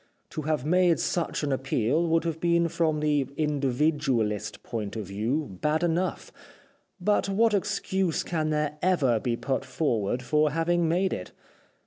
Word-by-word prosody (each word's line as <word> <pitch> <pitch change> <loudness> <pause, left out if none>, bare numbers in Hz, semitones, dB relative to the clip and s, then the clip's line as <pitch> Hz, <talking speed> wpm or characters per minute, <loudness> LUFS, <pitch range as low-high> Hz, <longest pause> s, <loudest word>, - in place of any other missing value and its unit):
To 155 - -4
have 150 -3 -1
made 180 +1 +3
such 170 -3 -1
an 145 - 0
appeal 135 +4 +1
would 165 0 +2
have 165 -1 -3
been 170 0 +2
from 155 -2 0
the 145 -3 +1
individualist 140 -6 0
point 110 -3 -4
of 110 -2 -4
view 105 - -3
bad 155 +2 +1
enough, 175 +2 -1 0.7
but 200 +2 +1
what 220 +3 +3
excuse 190 -3 0
can 155 -3 -1
there 150 -1 -1
ever 145 -11 +2
be 120 +1 -1
put 135 +1 -2
forward 125 -4 -1
for 150 +3 +2
having 165 +2 +1
made 180 +3 +1
it 90 - -6
150 Hz, 150 wpm, -27 LUFS, 130-170 Hz, 0.7 s, made